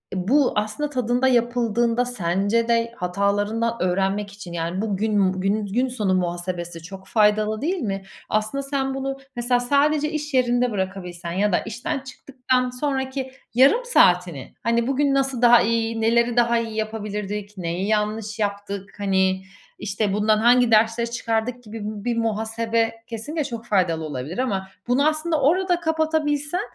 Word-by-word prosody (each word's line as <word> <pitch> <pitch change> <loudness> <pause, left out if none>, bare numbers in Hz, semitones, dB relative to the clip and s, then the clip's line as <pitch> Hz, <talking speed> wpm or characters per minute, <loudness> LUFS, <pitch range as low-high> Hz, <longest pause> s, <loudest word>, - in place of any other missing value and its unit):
bu 250 +9 +2
aslında 215 +8 -1
tadında 250 -1 +1
yapıldığında 240 -1 +1
sence 205 0 0
de 230 0 +1
hatalarından 205 +5 0
öğrenmek 195 +2 0
için, 195 -4 -10
yani, 170 +3 -2
bugün 205 -2 +1
bugünün 195 +3 0
gün 240 +7 0
sonu 215 -7 -1
muhasebesi 175 -1 -3
çok 190 +2 -10
faydalı 215 0 +2
değil 355 +6 0
mi? 195 -6 -3 0.3
Aslında 215 +6 -1
sen 270 -1 -1
bunu 270 0 -3 0.2
mesela 245 +1 +1
sadece 290 +4 +2
iş 300 -1 -4
yerinde 245 -1 +2
bırakabilsen 185 -3 -4
ya 200 +4 +1
da 175 - +3
işten 240 +6 -4
çıktıktan 255 -1 -2
sonraki 265 0 -3 0.2
yarım 275 - +5
saatini, 180 - +3
hani, 235 +1 +1
"Bugün 275 +1 +2
nasıl 270 -3 0
daha 240 -1 +7
iyi, 230 0 0
neleri 235 +1 +2
daha 235 0 +4
iyi 225 -1 -4
yapabilirdik, 210 -1 -4
neyi 180 +2 -2
yanlış 215 0 -1
yaptık, 200 -1 -3
hani, 190 -1 +1 0.4
işte, 205 0 -1
bundan 215 +1 +3
hangi 240 +1 +4
dersleri 225 +2 +3
çıkardık?" 235 +1 -2
gibi 225 0 -8
bi 210 -1 -6
bir 240 -1 0
muhasebe 225 +1 0 0.2
kesinlikle 270 +7 -4
çok 235 -4 -6
faydalı 180 -7 +1
olabilir 150 +3 -5
ama 200 -7 -1 0.2
bunu 270 +4 +3
aslında 310 0 0
orada 355 +5 +2
kapatabilsen, 315 0 0
225 Hz, 145 wpm, -23 LUFS, 200-255 Hz, 0.4 s, daha